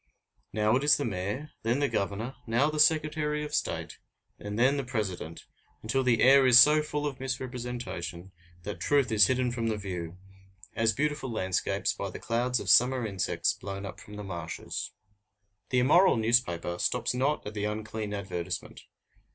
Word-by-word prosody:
Now 110 +2 +2
it 135 - -3
is 150 +1 +5
the 145 - -2
Mayor, 105 +8 -4
then 115 +3 0
the 145 0 +1
Governor, 105 +3 -3
now 120 +7 +2
the 155 - -3
Secretary 150 -1 +2
of 150 - -8
State, - - -3 0.4
and 105 0 -6
then 130 +4 +3
the 140 - -1
President, 100 - -4 0.4
until 110 +5 0
the 120 -4 +2
air 135 +1 +7
is 125 -1 +8
so 150 +4 +7
full 150 -1 -3
of 140 -3 -4
misrepresentation 125 -9 -5 0.3
that 105 - -6
truth 140 -4 +2
is 105 -3 +6
hidden 130 -1 0
from 115 -1 -2
the 110 -1 -1
view, 90 -4 -6 0.6
as 115 0 +2
beautiful 145 +2 -2
landscapes 95 -5 -1
by - - -5
the - - -8
clouds 120 +1 -1
of - - -7
summer 125 0 +4
insects 100 -4 -1
blown 100 0 -7
up 90 -3 -8
from 105 - -12
the 105 - -7
marshes. 85 -4 -5 0.8
The 125 - 0
immoral 145 +6 +5
newspaper 110 -7 +1
stops - - 0
not 135 +4 0
at 105 - -6
the 105 -1 -3
unclean 110 0 -4
advertisement. 90 -3 -5
115 Hz, 170 wpm, -28 LUFS, 100-135 Hz, 0.8 s, is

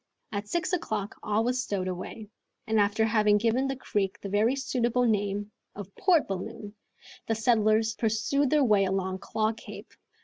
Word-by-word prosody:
At 205 -1 -4
six 345 - -2
o'clock, 215 - -2
all 210 +1 0
was 250 +2 0
stowed 200 -7 -2
away, 195 +4 -6 0.3
and 220 -2 +1
after 205 +2 +2
having 210 -2 +3
given 235 +5 +1
the 270 - -2
creek 205 -6 -2
the 200 - -6
very 215 +6 +2
suitable 250 -2 0
name 205 -2 0 0.2
of 200 -1 -9
"Port 360 -5 +3
Balloon," 195 +2 -6 0.5
the 225 - +1
settlers 220 -1 +2
pursued 225 +6 0
their 300 0 +3
way 210 -5 +4
along 190 0 -2
Claw 215 +2 -1
Cape. - - -11
215 Hz, 165 wpm, -28 LUFS, 205-240 Hz, 0.5 s, way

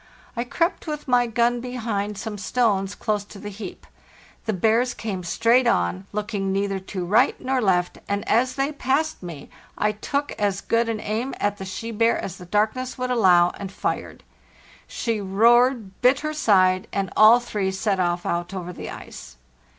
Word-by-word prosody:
I 235 0 -2
crept 335 +7 -1
with 300 -1 -5
my 245 -1 +3
gun 235 +1 +1
behind 220 -5 -3
some 210 0 -5
stones 205 -4 0
close 210 -2 -1
to 205 - -13
the 205 +1 -7
heap. 195 -2 -9 0.6
The - - +2
bears 225 +5 +2
came 195 -5 -4
straight 235 +8 +3
on, 90 - 0
looking 205 -2 -2
neither 195 0 -1
to 190 -1 -5
right 215 +8 +3
nor 260 0 0
left, 180 -4 +1
and 200 0 -2
as 255 +3 +2
they 275 +2 0
passed 290 +2 -1
me 165 -6 -8 0.3
I 210 - +2
took 280 +7 -3
as 200 -2 +1
good 230 +2 0
an 225 -1 -2
aim 225 +6 -3
at 205 0 0
the 195 - -6
she 225 +5 -5
bear 230 +1 +2
as 185 0 -5
the 180 - -11
darkness 220 +7 0
would 255 0 -2
allow, 180 -7 +5
and 195 -1 -6
fired. - - -4 0.6
She 225 -3 -2
roared, 225 +1 +3
bit 255 +3 +4
her 305 0 -2
side, 185 -9 +3
and 195 -3 -2
all 220 +3 +8
three 210 -5 -2
set 190 0 -1
off 175 -1 0
out 175 +2 -2
over 180 -1 -5
the - - -7
ice. - - -10
210 Hz, 180 wpm, -23 LUFS, 190-245 Hz, 0.6 s, all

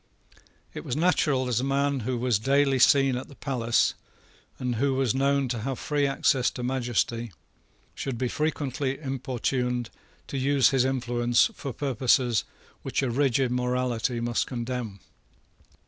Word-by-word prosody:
It - - -7
was 120 - -3
natural 150 -5 +2
that 125 -2 0
a - - -2
man 140 0 +1
who 125 +2 -2
was 120 -3 +1
daily 135 +2 +2
seen 135 0 +5
at 125 - -5
the 140 - -14
palace, 120 -5 +1 0.6
and 125 -2 -2
who 135 +2 +1
was 130 -4 +1
known 140 0 +1
to 120 -1 -2
have 130 +3 -3
free 145 -2 0
access 135 -2 +2
to 125 - -7
majesty, 120 -2 -1 0.6
should 130 -3 -4
be 125 - -1
frequently 140 -2 -2
importuned 125 -3 -2 0.3
to 135 - -4
use 135 -1 +4
his 130 -2 +2
influence 120 -2 +1
for 135 - -6
purposes 125 -2 +1 0.4
which - - -2
a 130 - 0
rigid 135 -1 +1
morality 125 -1 -1
must 120 0 -1
condemn. 120 -5 -4
130 Hz, 145 wpm, -26 LUFS, 120-135 Hz, 0.6 s, seen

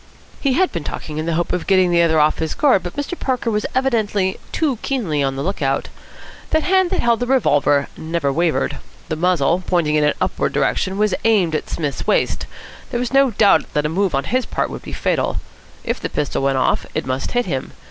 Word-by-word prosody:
He 275 -2 +1
had 370 +6 +2
been 170 - -4
talking 155 +1 -5
in 155 - -3
the 165 - 0
hope 175 +1 -1
of 180 - -2
getting 185 -2 +4
the 170 0 +4
other 160 -2 +3
off 150 +1 +3
his 160 -1 -2
guard; 270 -10 +3
but 175 - -7
Mr. 290 +5 -3
Parker 250 -3 -1
was 210 0 -1
evidently 215 -7 +1
too 290 -6 0
keenly 195 - -1
on 135 -1 0
the 135 - -3
look 195 0 -3
out. 135 0 0 0.6
The 315 - +2
hand 375 +1 +2
that - - 0
held 235 -1 +2
the 245 - -2
revolver 145 - +3
never 160 -3 -2
wavered. 160 -4 0 0.3
The 160 - -1
muzzle, 175 0 +2
pointing 170 -4 +1
in 150 -1 +3
an 150 - +2
upward - - -1
direction, 190 +1 0
was 210 -2 +2
aimed 200 -8 +3
at 155 - -2
Psmith's 145 -4 -3
waist. - - +1 0.4
There 240 - -2
was 250 +1 -3
no 275 0 +5
doubt 205 -2 +3
that 150 0 +1
a - - +1
move 185 -1 0
on 135 - 0
his 255 - -1
part - - -2
would - - -6
be - - -9
fatal. - - -1 0.5
If - - -2
the - - -4
pistol 145 -2 -2
went 135 -1 +1
off, 130 - +1
it - - -1
must 130 +1 -3
hit 245 0 +1
him. 135 -8 -4
180 Hz, 225 wpm, -20 LUFS, 150-240 Hz, 0.6 s, no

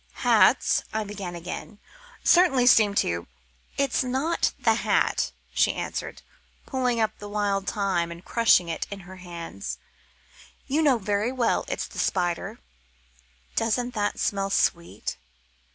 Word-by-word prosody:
"Hats," - - +4
I 220 0 -1
began 200 -4 -6
again, 180 +4 -7 0.5
"certainly 310 -9 +5
seem 215 -5 +5
to 85 - 0 0.3
" - - -33
"It's 275 -3 +1
not 265 +7 0
the - - +3
hat," - - +1 0.2
she - - +3
answered, - - -5 0.4
pulling 250 -3 0
up 220 -1 0
the 205 - -8
wild 200 -1 -1
thyme 190 -5 0
and 170 +2 -10
crushing 230 -6 +4
it 165 - -3
in 200 -1 -7
her 185 +1 -12
hands, 165 - -7 0.9
"you 295 +4 +1
know 280 -5 +4
very 205 +2 -1
well 255 -3 +1
it's - - -3
the - - -9
spider. 175 -2 -1 1.0
Doesn't 240 +2 0
that 205 -2 -1
smell 195 -1 0
sweet?" 170 -3 -1
205 Hz, 135 wpm, -26 LUFS, 180-245 Hz, 1.0 s, certainly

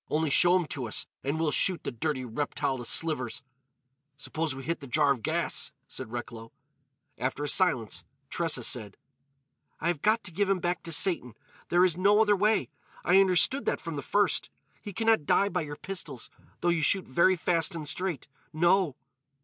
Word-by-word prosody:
"Only 155 -1 0
show 175 +5 +6
him 180 -2 +2
to 130 -5 -4
us 110 - -2 0.2
and 140 +4 -2
we'll 160 -2 +1
shoot 185 +4 +2
the - - -3
dirty 130 +1 -2
reptile 140 +2 -2
to 120 - -6
slivers——" 130 -5 +1 0.7
"Suppose 155 -1 -3
we 135 - -8
hit 170 +3 -2
the 140 - -10
jar 145 +2 +3
of 130 -4 -1
gas," - - -1 0.2
said 125 -4 -8
Recklow. 115 -1 -7 0.7
After 130 +3 -2
a - - -2
silence, 135 - +1 0.3
Tressa 160 -7 -1
said: 110 -5 -3 0.8
"I 170 - 0
have 165 -5 -2
got 215 +1 +2
to 195 - -6
give 200 +3 0
him 195 - +3
back 175 -1 -2
to 165 - -5
Satan. 150 - +1 0.3
There 175 +1 +5
is 175 -2 0
no 200 +3 +4
other 210 -2 +4
way. 210 +3 +1 0.4
I 190 +2 +6
understood 195 +8 +3
that - - 0
from 165 -2 -6
the 140 - -3
first. 205 +8 +1 0.3
He 205 - -7
can 225 +4 -3
not 225 -10 +3
die 200 - +3
by 180 -1 -1
your 145 -2 -6
pistols, 160 -9 -7 0.3
though 175 - +2
you 170 -2 +1
shoot 190 +5 +1
very 170 +8 +3
fast 170 -1 0
and 155 -3 -5
straight. 170 0 -2 0.2
No!" 170 -1 +2
165 Hz, 190 wpm, -28 LUFS, 135-185 Hz, 0.8 s, show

